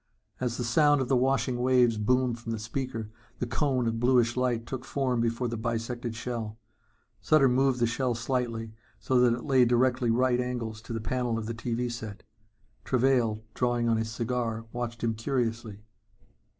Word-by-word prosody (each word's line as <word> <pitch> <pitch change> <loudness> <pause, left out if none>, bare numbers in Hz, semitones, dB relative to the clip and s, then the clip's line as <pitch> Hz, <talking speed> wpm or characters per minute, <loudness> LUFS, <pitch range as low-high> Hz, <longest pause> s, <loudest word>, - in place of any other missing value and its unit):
As 120 -2 -2
the 125 - -2
sound 145 +4 +4
of 130 - -2
the 135 - +4
washing 130 -1 +1
waves 125 -3 +4
boomed 125 +2 +1
from 115 0 -6
the - - -2
speaker, 115 0 -4 0.3
the 125 - -2
cone 125 +1 0
of 115 0 -1
bluish 120 -1 +3
light 125 -2 0
took 130 0 -5
form 130 -3 0
before 115 +2 0
the 115 0 -3
bisected 115 +1 -3
shell. 115 -2 -4 0.6
Sutter 155 -3 +5
moved 130 0 +2
the 120 - +3
shell 120 +1 0
slightly 115 -2 -2 0.3
so 130 -1 +2
that 120 -1 +4
it 120 - -8
lay 135 -3 +4
at 125 - +5
directly 125 0 +2
right 125 +1 +2
angles 120 -3 -3
to 115 - -7
the 115 - -3
panel 120 0 -1
of 110 - -4
the 115 - -3
TV 120 +1 -2
set. 110 -3 -7 0.6
Travail, 120 -4 +2
drawing 120 -1 0
on 115 -1 +3
his 110 0 -2
cigar, 115 -1 -2
watched 120 -1 -4
him 115 -1 +1
curiously. 115 -3 -2
120 Hz, 180 wpm, -28 LUFS, 115-125 Hz, 0.6 s, Sutter